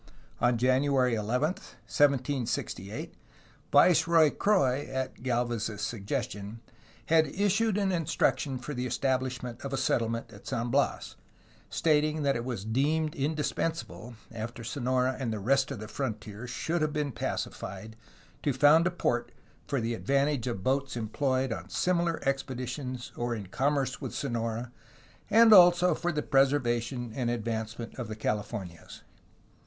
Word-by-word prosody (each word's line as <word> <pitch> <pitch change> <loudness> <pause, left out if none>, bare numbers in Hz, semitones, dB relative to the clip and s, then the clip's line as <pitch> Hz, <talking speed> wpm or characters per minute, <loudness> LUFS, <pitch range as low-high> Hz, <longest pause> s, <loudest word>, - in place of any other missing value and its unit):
On 120 0 +3
January 130 +1 +2
11, 115 +6 +1
1768, 130 - -1 0.6
Viceroy 165 -3 +5
Croix 145 -10 +2
(at 130 -1 -2
Gdlvez's 120 -4 -1
suggestion) 105 -1 -4 0.5
had 160 -1 +4
issued 205 +5 +1
an 200 -2 +1
instruction 150 -5 0
for 125 +4 -6
the 125 -1 -2
estab 130 +1 +1
lishment 125 -2 -6
of 140 -1 -5
a - - 0
settlement 115 -3 -1
at 100 - -14
San 120 +1 -2
Bias, - - 0 0.5
stating 155 -1 +1
that 140 -1 +2
it 120 - -2
was 120 -6 -4
deemed 150 +7 +1
indispensable, 150 -3 -3 0.2
after 115 +1 -6
Sonora 130 +1 0
and 125 -4 -2
the 110 - -2
rest 135 +7 +2
of 140 - -4
the 110 +1 -7
fron 125 -1 -2
tier 110 +2 -9
should 165 +6 -2
have 155 -1 0
been 150 -2 -1
pacified, 110 -2 -5 0.5
to 145 - +1
found 150 +6 +5
a - - +3
port 120 -9 -1 0.4
for 140 - 0
the 115 0 -1
ad 115 - -8
vantage 140 -2 +2
of 100 -6 -3
boats 135 +1 0
employed 130 +2 0
on 90 -1 -8
similar 170 - +1
expeditions 130 -1 -3
or 120 0 -2
in 105 -3 -6
com 135 +10 0
merce 135 -1 -2
with - - -5
Sonora 115 -2 -3 0.6
and 225 +1 +7
also 180 -1 +7
.for 175 - -1
the 150 -2 -2
preservation 120 -3 +1
and 125 -2 -1
advancement 115 -1 -3
of 120 - -4
the 110 - -5
Californias. 105 -5 -4
130 Hz, 145 wpm, -29 LUFS, 115-145 Hz, 0.6 s, and